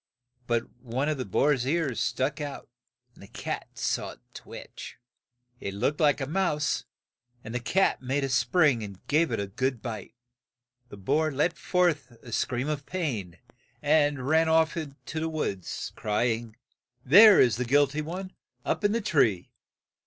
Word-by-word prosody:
But 115 -1 0
one 130 +4 -2
of 150 -3 -2
the 130 - -2
boar's 135 +6 +2
ears 145 -5 0
stuck 140 +4 -1
out, 145 -2 -6 0.5
and - - -19
the 100 - -12
cat - - -5
saw - - -2
it - - -20
twitch. - - -10 0.6
It 100 0 -5
looked 140 +9 0
like 150 -3 +3
a 135 - -2
mouse, 150 -2 0 0.6
and 110 - -8
the 125 - -1
cat 185 +10 +1
made 135 +2 -1
a 135 - -1
spring 140 -1 +3
and 100 -3 -9
gave 155 +3 +2
it - - -1
a 100 - -1
good 130 +6 -2
bite. 110 -1 -7 0.7
The 100 - -10
boar 150 +11 +1
let 150 +5 0
forth 155 -9 0
a 120 - -10
scream 125 +4 -1
of 150 -2 -3
pain, 115 - -3 0.4
and 145 -3 +2
ran 160 +2 +3
off 160 -1 +3
to 155 0 -6
the 160 +1 -2
woods, 100 - -4
cry 105 +3 0
ing, 115 -1 -4 0.5
"There 205 - +9
is 120 -4 +4
the 125 - 0
guil 145 +4 +5
ty 145 +2 -4
one, 185 +5 -6 0.3
up - - -1
in 205 0 +3
the 230 - 0
tree." 130 - +1
140 Hz, 170 wpm, -27 LUFS, 120-155 Hz, 0.7 s, There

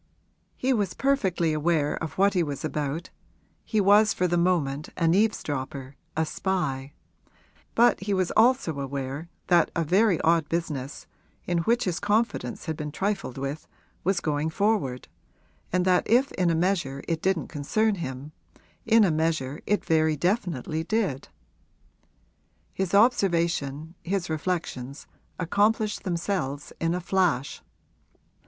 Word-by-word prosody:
He 260 +1 +1
was 205 -6 -1
perfectly 190 - +1
aware 155 -1 +1
of 160 -3 -5
what 200 +1 +4
he 180 - +2
was 145 -2 -3
about 150 +2 -3 0.5
he 220 - 0
was 205 +2 +5
for 180 - +1
the 175 - 0
moment 160 -5 +1
an 165 0 +3
eavesdropper, 140 -10 -1 0.2
a 160 - +2
spy; 155 -6 -2 0.8
but 240 +1 +5
he 195 +2 -4
was 185 -3 +1
also 225 - +3
aware 140 +3 -4 0.2
that 175 -2 +4
a 170 - +1
very 185 +3 +3
odd 165 -2 +2
business, 150 -5 -3 0.4
in 175 -1 0
which 235 +8 +2
his 180 -3 -1
confidence 215 0 -1
had 160 -2 -2
been 150 0 -5
trifled 195 -7 -2
with, 140 +3 -4 0.4
was 190 0 +1
going 150 0 -1
forward, 180 - 0 0.6
and 180 0 +1
that 180 -1 +2
if 250 +5 +4
in 180 -2 +1
a 165 - +2
measure 170 -6 0
it 165 -1 -1
didn't 190 -5 0
concern 190 +9 0
him, 140 -5 -6 0.6
in 225 0 +6
a 190 - +3
measure 155 -3 -1
it 210 - +1
very 160 -1 +3
definitely 170 - -1
did. 190 - -1 1.5
His 190 0 -1
observation, 170 - +2
his 185 -2 -2
reflections, 155 -5 -3 0.3
accomplished 210 +5 +1
themselves 170 -6 -2
in 165 +1 0
a 180 - -3
flash. 175 -8 0
170 Hz, 135 wpm, -26 LUFS, 150-195 Hz, 1.5 s, in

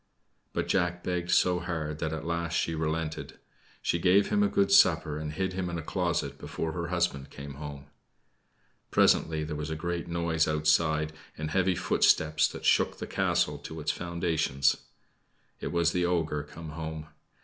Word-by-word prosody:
But - - -2
Jack 90 -2 0
begged 90 -1 -2
so 90 0 +3
hard 80 -4 -4
that 80 -1 -1
at 80 0 -4
last 85 0 -2
she 80 - 0
relented. 80 0 -3 0.5
She 85 - +1
gave 95 +4 +4
him 105 - +2
a 105 - +4
good 100 0 +2
supper 80 -5 +5
and 75 -1 -4
hid 95 +4 -2
him 90 -1 -2
in 85 - -3
a 80 - -5
closet 85 +1 -1
before 80 - -4
her 85 +1 -3
husband 85 -6 -1
came 70 0 -8
home. 70 -1 -7 1.0
Presently 80 -1 +3
there 75 0 -4
was 75 +1 -4
a 80 - -2
great 85 +1 -3
noise 85 -2 +1
outside 75 0 +2 0.2
and 75 0 -4
heavy 95 +1 +2
footsteps 80 -3 +3
that - - -8
shook - - +3
the - - -5
castle - - 0
to 80 - -8
its 75 0 0
foundations. 85 -5 0 0.8
It - - -4
was 85 -1 +2
the 90 0 0
ogre 80 -4 0
come 80 +2 -9
home. 80 0 -5
80 Hz, 170 wpm, -29 LUFS, 75-85 Hz, 1.0 s, supper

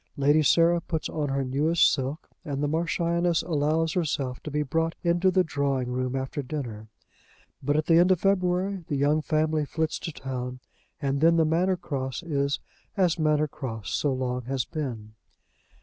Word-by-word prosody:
Lady 145 +3 +4
Sarah 170 +3 +4
puts 160 -2 -3
on 150 -2 -2
her 135 0 0
newest 150 +6 +3
silk, 140 +4 -3 0.2
and 145 -3 -3
the - - +2
Marchioness 170 +2 +1
allows 160 0 +1
herself 140 -7 -2
to - - -6
be 150 +1 0
brought 165 +3 -1
into 175 +2 +3
the 185 0 +3
drawing 140 -5 -1
room 130 +1 -2
after 135 +2 -3
dinner. 125 -6 -5 0.7
But 145 +2 +1
at 155 - +1
the 165 0 +5
end 180 +2 +5
of 185 - +3
February 185 0 +1
the 145 - -1
young 145 +3 +2
family 155 0 +1
flits 160 +2 -2
to 165 - -5
town, 130 -3 -5 0.4
and 140 0 -1
then 165 +1 +5
the 160 - +4
Manor 180 +4 +2
Cross 135 -4 -4
is 140 -4 0 0.4
as 180 -3 +2
Manor 155 -1 +2
Cross 115 -7 -6
so 145 - +1
long 125 -1 -2
has 130 -2 -1
been. 115 -8 -5
150 Hz, 175 wpm, -26 LUFS, 135-165 Hz, 0.7 s, the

